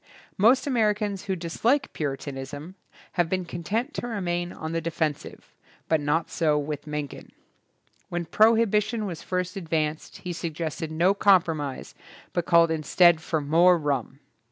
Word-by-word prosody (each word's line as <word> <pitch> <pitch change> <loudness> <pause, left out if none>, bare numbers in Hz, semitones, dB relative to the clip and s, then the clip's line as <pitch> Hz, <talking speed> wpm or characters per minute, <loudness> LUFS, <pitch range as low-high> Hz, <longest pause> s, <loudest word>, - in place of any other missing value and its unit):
Most 235 +7 +4
Americans 210 -6 0
who 190 -1 -1
dislike 230 - 0
Puritanism 145 +2 -5 0.4
have 175 -2 0
been 185 0 -1
content 215 - -3
to 240 - -4
remain 175 -6 -2
on 160 0 -6
the 165 0 -1
de 165 - -2
fensive, 155 -3 -4 0.3
but 160 -2 +2
not 150 +3 0
so 155 -3 +2
with 150 0 -4
Mencken. 150 -2 -6 0.8
When 175 0 -3
prohibition 220 +2 +3
was 175 -5 -5
first 180 0 -3
advanced 160 -4 -2
he 180 - -3
suggested 160 -1 -4
no 170 +5 +3
compromise 165 -9 +1 0.4
but 175 - -1
called 170 -1 +5
instead 160 +2 +4
for 160 -1 -1
more 170 +5 +5
rum. 140 -4 -2
170 Hz, 140 wpm, -26 LUFS, 155-195 Hz, 0.8 s, called